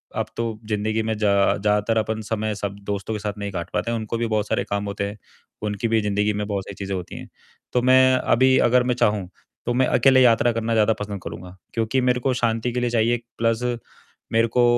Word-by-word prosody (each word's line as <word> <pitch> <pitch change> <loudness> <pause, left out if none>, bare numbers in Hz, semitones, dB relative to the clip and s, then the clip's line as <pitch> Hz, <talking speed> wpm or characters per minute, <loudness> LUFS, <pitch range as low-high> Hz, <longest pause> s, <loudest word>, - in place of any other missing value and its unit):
अब - - 0
तो 115 -2 -3
ज़िंदगी 110 +1 0
में 110 0 -1
जा 105 -1 +2 0.3
ज़्यादातर 105 +2 +1
अपन 110 0 -1
समय 110 -1 -1
सब 100 -1 -4
दोस्तों 100 +1 -3
के 105 - -3
साथ 105 0 -3
नहीं 100 -1 -4
काट 85 -1 -5
पाते 115 - -1
हैं 115 - 0
उनको 110 +1 -3
भी 115 - -1
बहुत 110 -2 0
सारे - - 0
काम 100 0 -1
होते 100 0 -3
हैं, 105 - -9 0.4
उनकी 105 +2 -2
भी 110 -1 +2
ज़िंदगी 105 +1 0
में 105 0 -2
बहुत 100 -2 -2
सारी 100 - -8
चीज़ें 100 -1 -4
होती 90 -2 -6
हैं, - - -9 0.5
तो 125 - +3
मैं 130 +1 +5
अभी 130 +1 +3
अगर 125 +1 +4
मैं 125 -1 0
चाहूँ, 105 -5 +1 0.4
तो 120 - 0
मैं 130 +1 +2
अकेले 130 -1 +5
यात्रा 120 -1 +4
करना 115 0 -1
ज़्यादा 110 0 +3
पसंद 100 -2 -5
करूँगा 90 +2 -8 0.2
क्योंकि 115 +3 0
मेरे 125 0 +2
को 130 +1 0
शांति 120 -1 0
के 125 - 0
लिए 120 0 0
चाहिए 120 +1 +2 0.2
प्लस 115 +1 +1 0.7
मेरे 115 +1 +3
को 120 +2 +2
110 Hz, 225 wpm, -23 LUFS, 105-120 Hz, 0.7 s, मैं